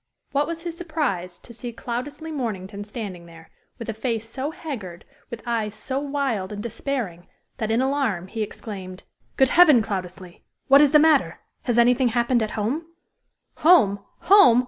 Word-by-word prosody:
What 285 +1 +1
was 335 0 -5
his 340 -2 -4
surprise 290 - -3
to 235 - -14
see 240 +1 -6
Cloudesley 265 +7 -5
Mornington 205 -7 -4
standing 205 -5 -7
there, 165 -1 -15 0.3
with 230 - -7
a 225 - -2
face 225 0 -3
so 265 +5 -4
haggard, 215 - -7 0.2
with 235 -3 -8
eyes 220 -3 -2
so 260 +5 -3
wild 275 -9 -2
and 205 0 -5
despairing, 230 -7 -4 0.3
that, 220 - -2
in 225 +3 +2
alarm, 265 -10 0
he 220 +4 -5
exclaimed: 195 -3 -7 0.3
"Good 265 -1 +5
heaven, 305 -10 +6
Cloudesley. 185 -3 -6 0.3
What 275 +1 +7
is 295 - +6
the 300 - +6
matter? 305 -2 +3 0.3
Has 240 -2 0
anything 245 +2 +4
happened 240 +1 +1
at 215 0 -3
home?" 265 +11 -2 0.7
"Home! 285 - +5 0.2
home! 390 - +7
235 Hz, 165 wpm, -24 LUFS, 205-280 Hz, 0.7 s, What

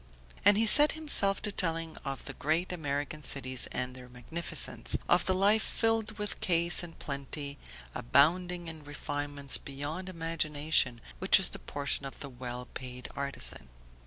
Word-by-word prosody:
And 205 0 +6
he 225 - +3
set 295 +7 +10
himself 250 -12 +3
to 210 - +1
telling 165 -4 -2
of 135 -1 -7
the - - -7
great 160 +5 -1
American 145 -2 -4
cities 130 -3 +1
and 125 0 -3
their 125 -1 -13
magnificence, 125 +8 -3
of - - +2
the 185 - +2
life 205 +3 +3
filled 225 -2 -1
with 210 -1 -4
ease 170 0 +4
and 170 -2 -10
plenty, 140 0 -6 0.3
abounding 175 +7 +1
in 160 -2 -8
refinements 145 -1 0
beyond 145 +7 -6
imagination, 155 -7 -1 0.2
which - - +5
is - - +1
the - - -3
portion 140 0 -3
of 135 - -12
the 140 - -8
well 125 0 -7
paid 125 -1 -8
artisan. 140 - -3
155 Hz, 155 wpm, -30 LUFS, 140-180 Hz, 0.3 s, set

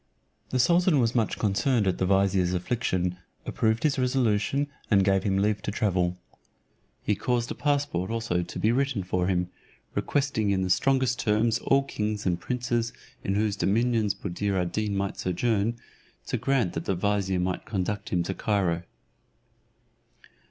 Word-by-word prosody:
The 130 - 0
sultan 170 +4 +4
was 115 -1 +2
much 115 -3 0
concerned 110 +3 +1
at 95 -2 0
the 95 - +1
vizier's 95 -2 +2
affliction, 90 -2 -1 0.3
approved 110 0 0
his 145 -3 +2
resolution, 125 +1 +1 0.2
and 100 -3 +4
gave 95 0 +3
him 95 -1 0
leave 105 +1 +1
to - - -4
travel. 90 -4 0 0.9
He 105 - +1
caused 120 +3 -1
a - - -1
passport 145 - 0
also 115 -6 -1
to 85 - -7
be 110 - +3
written 130 -5 0
for 90 0 -1
him, 90 -1 0 0.4
requesting 135 -7 0
in 95 -1 +1
the 90 - 0
strongest 130 +1 +2
terms 110 +2 +2
all 135 0 +3
kings 105 -5 -3
and 90 -2 +1
princes 120 -2 -1 0.3
in 95 - -1
whose 105 -1 +1
dominions 110 0 +1
Buddir 100 0 -2
ad 90 -1 -1
Deen 105 -2 -1
might 100 0 -2
sojourn, 110 +4 0 0.5
to - - -2
grant 125 -5 +1
that 80 - -4
the 95 - 0
vizier 95 -1 0
might 90 0 -2
conduct 100 0 -2
him 90 -2 +1
to 95 - -3
Cairo. 95 -5 0
105 Hz, 160 wpm, -27 LUFS, 95-120 Hz, 0.9 s, sultan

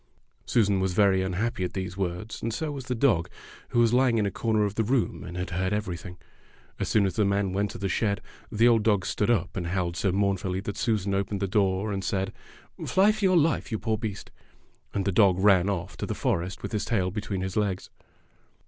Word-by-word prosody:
Susan 100 -4 +2
was 95 -1 0
very 95 -2 +4
unhappy 95 +2 -1
at 90 - -3
these 95 -1 -4
words, 95 +3 -4
and 115 - -2
so 150 +7 -3
was 135 -3 -6
the 125 -1 -2
dog, 110 -9 +2 0.4
who - - -2
was 115 0 +4
lying 125 -2 +4
in 105 - +2
a 100 - -1
corner 110 +1 +1
of 100 - -2
the 110 - 0
room 120 +1 0
and 90 0 -7
had 90 - -4
heard 95 +3 -1
everything. 90 -3 -4 0.6
As - - -2
soon 105 -2 +3
as 95 - -1
the 105 - +4
man 100 -1 +1
went 100 +1 0
to - - -7
the 100 - -2
shed, 100 +2 0 0.3
the 115 +3 +4
old 115 -2 +5
dog 105 -4 +2
stood 105 - 0
up 95 -7 +1
and 85 -3 -3
howled 90 -1 -1
so 95 +2 +1
mournfully 95 -1 0
that 100 0 -5
Susan 105 -3 0
opened 100 +1 -1
the 100 - -1
door, 100 0 +1
and 95 -1 -3
said, 95 +1 -1 0.5
"Fly 195 +3 +4
for 215 -1 -5
your 185 -2 +5
life, 155 -4 +1
you 110 - 0
poor 110 0 -1
beast." 105 -4 -5 0.6
And 100 -2 -2
the 100 - +1
dog 95 -1 +4
ran 95 -1 +4
off 95 -4 -3
to - - -4
the - - -3
forest 90 +2 -2
with 100 - -4
his 105 - -1
tail 95 -5 0
between 100 -1 -3
his 95 0 -4
legs. 100 -3 -1
100 Hz, 230 wpm, -27 LUFS, 95-110 Hz, 0.6 s, old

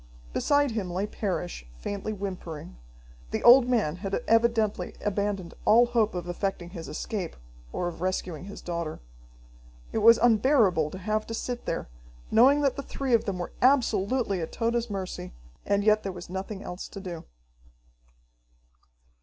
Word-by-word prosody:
Beside 285 -2 +2
him 210 -5 -3
lay 185 +3 -1
Parrish, 190 - -3
faintly 205 - -4
whimpering. 185 - -6 0.5
The - - -3
old 245 +1 +8
man 205 -10 +1
had 195 +1 -3
evidently 225 -2 +2
abandoned 200 -3 -1
all 235 +3 +6
hope 230 -4 +1
of 175 -1 -4
effecting 175 -1 -3
his 165 -3 -7
escape, 185 +2 -4 0.4
or 175 - -2
of 170 -1 -6
rescuing 180 -2 -2
his 200 - -9
daughter. 170 -3 -4 0.9
It - - 0
was 230 +2 +8
unbearable 220 - +4
to 185 - -8
have 215 +3 -2
to 225 - -4
sit 245 +1 -4
there, 165 - -2 0.4
knowing 265 +6 +6
that 280 -1 +1
the - - -2
three 275 -2 -3
of 230 - +4
them 195 -3 -2
were 175 - -4
absolutely 245 -5 +2
at 160 - -4
Tode's 235 0 -1
mercy, 185 - -5 0.3
and 200 0 +2
yet 215 0 +4
there 195 - -4
was 175 -1 -9
nothing 195 +2 -5
else 180 +1 -6
to 200 - -9
do. 175 -4 -7
200 Hz, 155 wpm, -27 LUFS, 180-230 Hz, 0.9 s, old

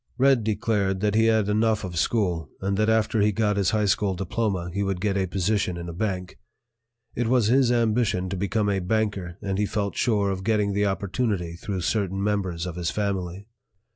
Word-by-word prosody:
"Red" 130 -3 +4
declared 105 -3 0
that 105 -1 +1
he 110 +1 +4
had 110 -2 +3
enough 110 +1 +1
of 90 -3 -5
school 85 -4 0
and 100 +1 -1
that 110 +2 +2
after 110 -1 +2
he 105 +1 +3
got 105 0 +1
his 100 -2 +2
high 105 +1 +1
school 100 0 +1
diploma, 95 -1 -2
he 100 - -1
would 95 -2 -1
get 100 +1 0
a 95 -1 0
position 95 0 0
in 85 0 -6
a 85 - -6
bank. 90 -1 -3 0.7
It 120 -1 -1
was 120 -3 +3
his 130 0 +4
ambition 115 -5 +1
to 95 - -3
become 100 +3 0
a 100 -1 +1
banker 95 -3 -1
and 100 -1 -2
he 105 - +1
felt 100 -2 -2
sure 105 -5 +1
of 95 0 -4
getting 105 -1 +1
the 100 +1 +1
opportunity 100 -2 -1
through 95 +2 -4
certain 95 +1 -1
members 95 -5 -1
of 90 -1 -5
his 85 -2 -1
family. 100 -2 -3
100 Hz, 200 wpm, -25 LUFS, 95-110 Hz, 0.7 s, Red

